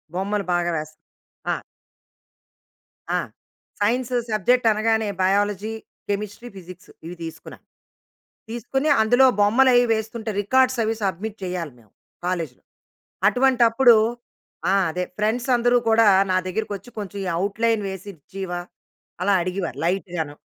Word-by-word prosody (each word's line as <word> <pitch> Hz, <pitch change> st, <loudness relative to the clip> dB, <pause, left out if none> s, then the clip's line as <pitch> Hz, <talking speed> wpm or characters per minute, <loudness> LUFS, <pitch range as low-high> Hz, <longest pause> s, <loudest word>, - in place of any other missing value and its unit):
బొమ్మలు 200 Hz, +2 st, -1 dB
బాగా 175 Hz, 0 st, +1 dB
వేస్ 155 Hz, 0 st, -6 dB, 0.6 s
ఆ! -, -, -2 dB, 1.6 s
ఆ! -, -, +2 dB, 0.6 s
సైన్స్ 240 Hz, +4 st, 0 dB, 0.2 s
సబ్జెక్ట్ 225 Hz, +3 st, +2 dB
అనగానే 220 Hz, 0 st, +1 dB
బయాలజీ, 205 Hz, +2 st, +1 dB, 0.4 s
కెమిస్ట్రీ, 210 Hz, +3 st, -4 dB
ఫిజిక్స్ 185 Hz, +1 st, -12 dB, 0.2 s
ఇవి 175 Hz, +2 st, -7 dB
తీసుకున్నా. 165 Hz, -1 st, -9 dB, 0.9 s
తీసుకొని, 265 Hz, +6 st, -2 dB
అందులో 245 Hz, +4 st, +5 dB
బొమ్మలు 235 Hz, +6 st, +5 dB
అయి 245 Hz, 0 st, +5 dB
వేస్తుంటే 220 Hz, +1 st, -3 dB
రికార్డ్స్ 260 Hz, +4 st, +2 dB
అవి 220 Hz, +1 st, 0 dB
సబ్మిట్ 200 Hz, +3 st, -3 dB
చేయాలి 180 Hz, -6 st, -4 dB
మేము 110 Hz, -4 st, -24 dB, 0.3 s
కాలేజ్‌లో. 165 Hz, -8 st, -3 dB, 0.7 s
అటువంటి 255 Hz, -1 st, +2 dB
అప్పుడు 240 Hz, +1 st, +6 dB, 0.8 s
ఆ! -, -, +4 dB, 0.2 s
అదే. 180 Hz, +3 st, -2 dB
ఫ్రెండ్స్ 225 Hz, +4 st, 0 dB
అందరూ 245 Hz, +1 st, +3 dB
కూడా 225 Hz, 0 st, +5 dB, 0.2 s
నా 185 Hz, -, +3 dB
దగ్గరకకొచ్చి, 205 Hz, +2 st, -4 dB
"కొంచెం 200 Hz, -1 st, -5 dB, 0.2 s
అవుట్‌లైన్ 215 Hz, +3 st, 0 dB
వేసిచ్చివా" 190 Hz, -1 st, -6 dB, 0.6 s
అలా 200 Hz, +1 st, +3 dB
అడిగేవారు 180 Hz, -4 st, -4 dB
లైట్ 190 Hz, +3 st, 0 dB
గాను. 155 Hz, -3 st, -3 dB
205 Hz, 115 wpm, -23 LUFS, 185-230 Hz, 1.6 s, అప్పుడు